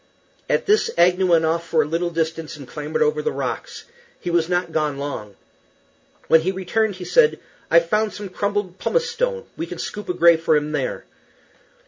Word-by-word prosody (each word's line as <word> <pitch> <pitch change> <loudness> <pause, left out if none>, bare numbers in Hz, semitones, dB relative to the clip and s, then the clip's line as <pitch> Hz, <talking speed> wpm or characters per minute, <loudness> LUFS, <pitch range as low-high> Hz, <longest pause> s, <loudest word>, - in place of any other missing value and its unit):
At - - +1
this 425 +1 +3
Agnew 180 +2 +4
went 165 -2 +4
off 165 +1 0
for 160 -2 +3
a - - -6
little 170 +3 -1
distance 165 -1 -3
and - - -11
clambered 470 0 -2
over 455 0 +1
the 460 0 -1
rocks. - - -4 0.4
He 175 - -4
was 170 -1 +1
not 175 -1 0
gone 150 -3 -1
long. 130 -8 -5 0.9
When 160 - +6
he 185 +4 0
returned 195 +3 -1
he 180 -1 -8
said, 475 -2 +4 0.3
"I've 170 0 +5
found 210 +3 +1
some 205 -1 -7
crumbled 200 -1 -2
pumice 475 - 0
stone; 475 0 -2
we 330 - -4
can - - -7
scoop 210 -2 -6
a 180 - -1
grave 170 -2 +5
for 160 -1 +3
him 150 +1 -2
there." 145 -4 -3
180 Hz, 190 wpm, -22 LUFS, 160-210 Hz, 0.9 s, When